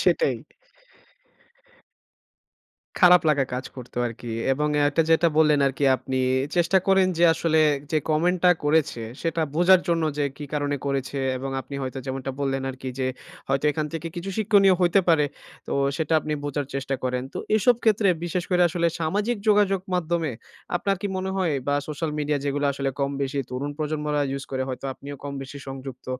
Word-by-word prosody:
সেটাই। 485 - +2 2.6
খারাপ 180 0 +7
লাগা 145 -3 +3
কাজ 130 +1 -4
করতো 125 -1 -11
আরকি 120 0 -7 0.2
এবং 150 +3 0 0.2
এটা 150 +3 +2
যেটা 165 +1 +5
বললেন, 150 -2 +5
আরকি 135 +1 -1
আপনি 130 0 -3 0.4
চেষ্টা 175 +2 +4
করেন 190 -1 +4
যে, 170 - +5
আসলে 160 -1 +2 0.3
যে, 155 - +2
কমেন্টটা 180 +3 +3
করেছে 150 -5 +2 0.2
সেটা 165 -1 0
বোঝার 175 +3 +6
জন্য 165 -1 +2 0.2
যে, 145 - +2
কি 150 - -7
কারণে 145 -1 -1
করেছে 140 0 -2 0.2
এবং 135 +1 -4
আপনি 140 - -10
হয়তো 130 0 -4
যেমনটা 135 0 -3
বললেন 135 -1 -1
আরকি 130 0 -7
যে, 130 - 0 0.4
হয়তো 135 +1 0
এখান 155 0 -2
থেকে 165 0 -4
কিছু 175 +3 -4
শিক্ষনীয় 200 -3 +5
হইতে 180 +2 +4
পারে। 160 -3 +5 0.4
তো - - -4 0.2
সেটা 160 -1 -2
আপনি 155 - -4
বোঝার 145 -1 -2
চেষ্টা 135 0 -2
করেন। 125 0 -1
তো - - -5 0.2
এসব 230 +4 +4
ক্ষেত্রে 215 -2 +3 0.2
বিশেষ 175 +1 -2
করে 180 -1 +4
আসলে 170 +1 0
সামাজিক 205 +9 0
যোগাযোগ 205 -2 +4
মাধ্যমে 170 -3 0 0.5
আপনার 195 +2 0
কি - - 0
মনে 190 0 -2
হয় 180 -5 +1 0.2
বা 145 - +2
সোশ্যাল 155 +1 -3
মিডিয়া 150 0 0
যেগুলো 145 0 -1
আসলে 135 0 -2
কম 140 0 +1
বেশি 140 +1 -2
তরুণ 135 +3 -3
প্রজন্মরা 150 -1 -1
ইউজ 135 0 -4
করে 130 -1 -1
হয়তো 130 +1 -6
আপনিও 140 +1 -9
কম 140 - -4
বেশি 135 +1 -9
সংযুক্ত। 135 -1 -8
150 Hz, 170 wpm, -24 LUFS, 135-175 Hz, 2.6 s, খারাপ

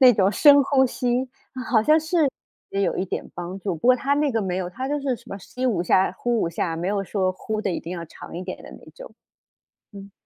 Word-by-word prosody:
那 255 -2 +8
种 195 -2 +3
深 285 +6 +7
呼 265 -1 +3
吸， 250 +1 -1 0.3
嗯， 255 - -5
好 220 -4 +3
像 305 +7 +5
是 320 +3 -2 0.5
也 195 - -1
有 - - 0
一 185 - -1
点 - - -5
帮 175 +2 -6
助， 190 -3 -2
不 160 - -4
过 255 - +7
它 280 +2 +1
那 290 -1 +1
个 225 -2 0
没 185 -2 -2
有， 180 -1 -3
它 255 +8 -4
就 295 +1 0
是 270 -3 -1
什 - - -20
么 195 - -5
吸 250 +7 -4
5 195 -8 +1
下、 185 +2 +3
呼 240 -2 0
5 165 - +1
下， 165 -1 -2
没 170 +2 -3
有 200 -1 0
说 185 -1 0
呼 215 +3 -4
的 200 - -1
一 175 - -2
定 170 - -7
要 170 -2 -5
长 165 - -11
一 180 - -4
点 185 - -7
的 - - -11
那 - - -14
种， - - -11 0.8
嗯。 200 0 -11
215 Hz, 270 characters per minute, -24 LUFS, 185-260 Hz, 0.8 s, 那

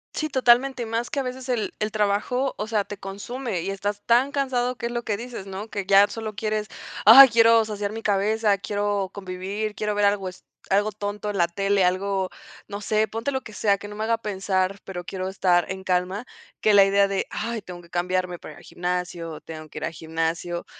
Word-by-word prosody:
Sí, 310 0 -2
totalmente. 255 -1 +3
Más 230 +2 -2
que 285 - -2
a 275 - 0
veces 255 0 -6
el 235 -4 -1
el 215 0 -1
trabajo, 215 +6 0
o 210 - -3
sea, 215 -3 0
te 205 - -7
consume 200 +1 -5
y 190 - -3
estás 205 +1 -3
tan 250 +4 +4
cansado 255 -3 0
que 235 - -5
es 235 - -2
lo 240 0 -2
que 205 -2 -1
dices, 235 -4 -7
¿no?, 195 +3 -6
que 200 -3 -4
ya 200 +1 +6
solo 220 -2 -6
quieres, 215 -1 -1 0.4
ay, 265 +5 +12
quiero 230 -1 +5
saciar 205 -1 -3
mi 225 +1 -6
cabeza, 210 0 +2
quiero 205 -1 -1
convivir, 200 +2 -4
quiero 210 -1 -1
ver 205 0 +2
algo 200 -2 +1
es 180 - -15 0.2
algo 205 +2 +2
tonto 205 0 -4
en 200 - -3
la 170 - +3
tele, 195 +1 +1
algo, 190 +1 0 0.4
no 200 0 -5
sé, 215 +1 +1
ponte 230 +6 -2
lo 265 - -2
que 220 - -11
sea, 200 -1 +2
que 205 - -9
no 210 - -8
me 220 - -2
haga 230 0 +2
pensar, 195 -2 -1
pero 180 -2 -6
quiero 185 +1 -4
estar 180 -2 +2
en 190 0 -5
calma, 185 +5 -1 0.4
que 215 - +4
la 200 -1 +8
idea 200 0 +3
de: 195 - -1
"Ay, 225 0 -3
tengo 175 -2 -9
que 170 - -19
cambiarme 180 0 -1
para - - -10
ir - - -16
al - - -17
gimnasio, 175 -2 -4
tengo 155 -1 -9
que - - -7
ir - - -3
al - - -3
gimnasio", 165 +2 -3
205 Hz, 220 wpm, -24 LUFS, 190-225 Hz, 0.4 s, ay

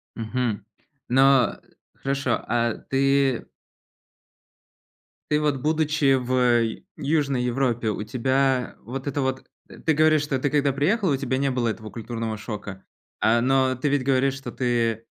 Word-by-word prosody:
Мгм. 115 -2 -2 0.4
Ну 135 0 +4 0.5
хорошо, 135 -3 -1
а 120 -1 +1
ты 135 -1 +1 1.9
ты 150 - +3
вот, 150 -2 +1
будучи 150 -1 +2
в, 130 0 -2
э, 120 -3 +2
Южной 140 -3 0
Европе, 120 -2 0
у 105 0 -3
тебя 130 +2 0
вот 130 +5 -6
это 140 0 -1
вот 130 0 -2 0.2
Ты 160 - -1
говоришь, 155 0 +4
что 145 -2 -1
ты 145 - 0
когда 145 -1 +2
приехала, 170 - +1
у - - +1
тебя 130 -1 -1
не 140 0 +1
было 125 -3 0
этого 110 0 -6
культурного 115 -1 -5
шока, 100 -3 -7 0.4
э, 115 +2 +4
но 130 +1 +2
ты 130 +4 -1
ведь 140 -1 +1
говоришь, 135 0 +2
что 135 - -7
ты, 115 -3 -1
130 Hz, 145 wpm, -24 LUFS, 120-140 Hz, 1.9 s, Ну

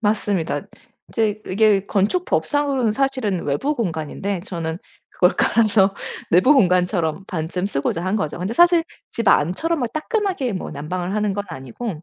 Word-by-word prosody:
맞습니다. 205 -5 0 0.5
이제 215 -2 0
이게 200 0 +3
건축법상으로는 270 - +1
사실은 255 -7 -1
외부 210 - 0
공간인데 185 - -3
저는 170 -4 -4 0.3
그걸 180 - +3
깔아서 210 -3 +3 0.4
내부 185 - +6
공간처럼 180 - +2
반쯤 180 +2 -3
쓰고자 165 -1 -2
한 185 +2 0
거죠. 155 -7 -3
근데 185 +5 -3
사실 345 +2 +5 0.3
집 230 - -4
안처럼 195 - +2
뭐 245 - 0
따끈하게 365 - -1
뭐 185 - -5
난방을 175 +6 -4
하는 210 -1 0
건 205 0 -3
아니고 160 - -6
200 Hz, 340 characters per minute, -21 LUFS, 175-240 Hz, 0.5 s, 내부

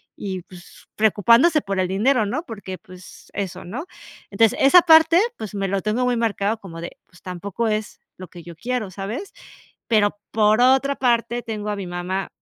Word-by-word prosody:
y 190 -2 -5
pues 180 0 -16
preocupándose 230 - +4
por 195 -1 -3
el 185 - +1
dinero", 220 +5 +2
¿no?, 250 +10 -2
porque 200 - -8
pues 185 0 -15
eso, 190 -2 -5
¿no? 240 - -6 0.5
Entonces 215 +2 +3
esa 280 +7 +7
parte, 325 +1 +6 0.2
pues 215 -3 -7
me 195 -1 -1
lo 195 0 -1
tengo 220 +4 0
muy 245 -1 +1
marcado 220 -1 0
como 165 -5 -10
de, 170 - -8
pues 180 - -21
tampoco 190 +5 -4
es 215 0 -3 0.2
lo 185 -2 -10
que 175 - -12
yo 170 0 -11
quiero, 240 +2 -3
¿sabes?, 210 - -6 0.6
pero 205 -2 +2
por 215 +1 +3
otra 265 +2 +3
parte 240 -1 +1
tengo 210 -2 -5
a 205 - -2
mi 195 -2 -6
mamá 180 +2 -4
210 Hz, 185 wpm, -22 LUFS, 190-245 Hz, 0.6 s, esa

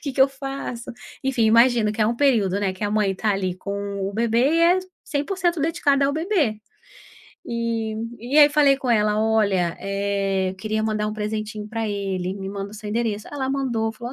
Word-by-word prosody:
que 280 -3 -3
que 265 - -2
eu 270 - +5
faço?" 270 -3 -6 0.3
Enfim, 255 -4 +1
imagino 230 -1 +4
que 215 - 0
é - - +3
um 235 +1 0
período, 220 -9 +2
né, 195 -2 0
que 185 - -10
a 205 - -1
mãe 210 -2 +1
está 210 +3 -1
ali 185 -2 -1
com 200 0 -4
o - - -6
bebê, 230 +1 +1 0.2
e - - +3
é 350 +2 +5 0.3
100% 345 +3 -1
dedicada 285 -3 +2
ao 280 - 0
bebê. 315 - 0 0.9
Eh, 230 -2 -2 0.3
e 255 +6 +1
aí 295 -1 +9
falei 285 -2 +4
com 265 -2 -5
ela: 210 -1 +2
"Olha, 200 -6 +1
eh, 195 -1 -1
eu 190 - -8
queria 215 +2 -2
mandar 215 -1 -1
um - - -4
presentinho 215 0 -4
pra 225 -1 -3
ele, 195 -2 -2
me 195 -1 -6
manda 200 0 -5
o - - -10
seu 210 0 -8
endereço", 220 -2 -2
ela 265 -2 -2
mandou, 240 -5 -1
falou: 240 +3 -7
220 Hz, 205 wpm, -23 LUFS, 200-270 Hz, 0.9 s, aí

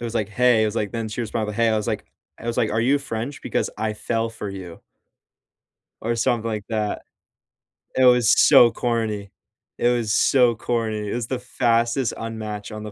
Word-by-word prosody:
was 115 -1 -4
like, 105 -3 0
"Hey." 120 +1 +3
It - - +3
was 105 - -3
like 105 -3 -1
then 115 0 -4
she 105 +3 -5
was 115 -3 -4
probably, 105 -2 -2
"Hey." 115 +1 +2
I 110 - +2
was 105 - -2
like 110 -3 -2 0.3
I - - -10
was 115 - -2
like, 110 - +1
"Are 110 - +1
you 135 +5 +3
French? 135 0 -5
Because - - -1
I 110 -1 -1
fell 115 +1 -2
for 110 -2 -7
you" 95 -3 -9 1.2
or 115 +2 -1
something 115 0 0
like 105 -2 -3
that. 110 -2 -2 0.9
It 130 - +4
was 125 -3 +5 0.2
so 120 -1 +7
corny. 110 -5 -2 0.5
It 120 - +2
was 120 -3 0
so 125 0 +4
corny. 110 -3 -2
It - - -3
was 120 -2 -3
the 130 - -3
fastest 120 0 0
unmatch 110 -1 -6
on 105 - -7
the 105 - -7
115 Hz, 205 wpm, -23 LUFS, 105-120 Hz, 1.2 s, so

